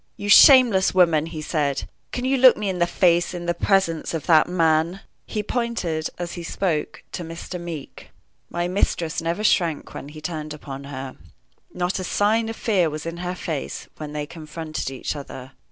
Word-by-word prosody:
"You 205 - -5
shameless 235 - +7
woman!" 165 -4 +4
he 155 -2 -6
said. 145 -4 -1 0.2
"Can 250 - -3
you 265 +1 +2
look 255 -1 +7
me 210 -2 -2
in 185 -2 -3
the 175 - +3
face 175 0 +2
in 175 -1 -5
the 175 - +1
presence 170 -3 +1
of 155 - -4
that 160 0 +5
man?" 165 +1 +1 0.3
He 210 - -3
pointed, 210 -10 -2
as 175 -1 -4
he 175 - -6
spoke, 165 -2 -2
to 175 - -5
Mr. 165 +2 -7
Meeke. 165 -4 -8 0.4
My 175 0 -2
mistress 175 -3 -1
never 170 +5 -2
shrank 170 -7 +1
when 140 - -8
he 155 +1 -10
turned 155 -2 -5
upon 140 -2 -8
her. 135 -2 -7 0.5
Not 180 +1 -2
a - - -3
sign 220 +4 +1
of 225 - -5
fear 190 -9 +1
was 155 +1 -6
in 165 0 -5
her 180 +1 -4
face 160 -5 -5
when 150 -1 -6
they 150 0 -3
confronted 155 -1 -6
each 135 +3 -4
other. 130 -2 -9
170 Hz, 185 wpm, -23 LUFS, 155-190 Hz, 0.5 s, shameless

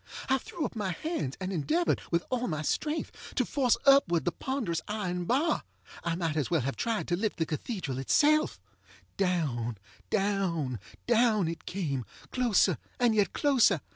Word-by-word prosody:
I 265 0 +4
threw 325 +2 -4
up - - -5
my 200 -4 -1
hands 170 - -3
and 190 0 -3
endeavored, 315 - +1
with 170 0 +1
all 250 -1 0
my 155 -3 -2
strength, 305 - -3
to 255 - +2
force 255 -3 +2
upward 190 - +5
the 175 - +2
ponderous 220 - -2
iron 180 -4 -2
bar. 280 - +2 0.4
I 170 -1 0
might 165 -3 -1
as 150 -3 0
well 165 -4 +2
have 135 +2 -2
tried 230 -2 -1
to 175 - +2
lift 210 +4 -1
the 165 - +1
cathedral 155 - -3
itself. 305 - +3 0.6
Down, 145 - 0 0.3
down, 175 - 0 0.3
down 225 -6 +3
it 165 0 -6
came, 150 -9 -2 0.3
closer 245 -6 +3 0.2
and 240 -2 +4
yet 210 -2 +2
closer. 275 -5 +4
195 Hz, 165 wpm, -29 LUFS, 165-250 Hz, 0.6 s, upward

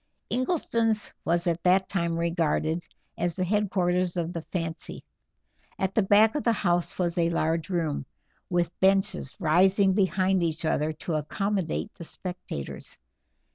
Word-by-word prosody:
Ingleston's 230 - 0
was 170 +1 +1
at 170 -1 0
that 185 +2 +3
time 170 -3 -1
regarded 165 -1 0 0.3
as 175 -1 0
the 185 - -1
headquarters 180 -2 +1
of 170 0 -2
the 170 - -4
fancy. 165 -3 -4 0.7
At 190 0 -1
the 220 - +3
back 210 +3 +5
of 295 - -2
the 235 - +3
house 175 -5 0
was 175 -1 0
a 170 0 +3
large 165 +1 0
room, 160 -7 -1 0.4
with 175 -2 -1
benches 190 -6 +2
rising 190 +4 +4
behind 190 -1 +2
each 165 -1 -1
other 155 0 +1
to 160 +2 -5
accommodate 185 +4 -2
the - - -10
spectators. 175 - -6
175 Hz, 140 wpm, -27 LUFS, 165-195 Hz, 0.7 s, back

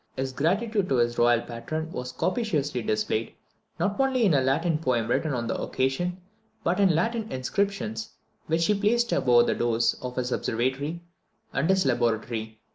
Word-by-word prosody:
His 130 0 -3
gratitude 195 - 0
to 135 - +2
his 120 -1 +1
royal 120 0 +4
patron 155 +9 -5
was 125 -4 -5
copiously 150 - -1
displayed, 110 +1 -1 0.5
not 200 +3 0
only 265 -3 +3
in 185 - +4
a 140 - +4
Latin 150 +5 +1
poem 125 -7 0
written 150 +6 0
on 120 -3 -2
the 115 - -2
occasion, 175 +8 -1 0.4
but 175 +3 +1
in 190 -5 +4
Latin 220 +6 -1
inscriptions 130 - -2 0.4
which 165 +1 +2
he 210 - +3
placed 230 +4 +1
above 120 -2 +4
the - - +1
doors 115 -1 +1
of 125 -1 -5
his 125 0 -2
observatory 135 +10 -1 0.5
and 140 +6 0
his 190 -4 +3
laboratory. 115 -3 -1
135 Hz, 165 wpm, -26 LUFS, 120-185 Hz, 0.5 s, royal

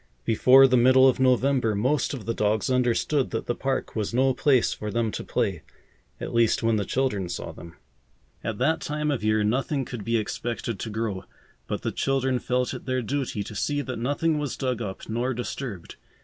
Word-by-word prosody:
Before 130 +4 +6
the 130 -1 +3
middle 130 +2 +6
of 130 - +2
November 130 -3 +2
most 130 +9 +1
of 120 - -9
the 115 - -1
dogs 105 +3 0
understood 125 +3 +1
that 115 - -3
the 120 - -1
park 135 +2 -3
was 110 +1 -2
no 130 +1 +3
place 130 -2 +3
for 105 - -5
them 115 +1 0
to - - -5
play, - - -1 0.6
at - - -5
least 115 0 +2
when 115 -1 +2
the 100 - -1
children 105 -9 -1
saw 85 - -5
them. 85 -1 -12 0.7
At 110 -2 -3
that 150 +7 +1
time 150 0 -1
of 135 -6 -2
year 110 0 +2
nothing 135 +5 0
could 120 -4 -6
be 115 +3 +1
expected 115 0 -3
to 110 - -4
grow, 110 -3 -3 0.4
but - - -4
the - - -1
children 135 -2 0
felt 125 0 -1
it - - -8
their 130 -1 0
duty 130 -4 -2
to 110 - -9
see 145 +7 -1
that 130 -4 -5
nothing 145 +5 0
was 145 -3 -3
dug 130 -3 -2
up 95 -4 -6
nor 120 +3 -1
disturbed. 120 -6 -6
125 Hz, 200 wpm, -25 LUFS, 110-135 Hz, 0.7 s, Before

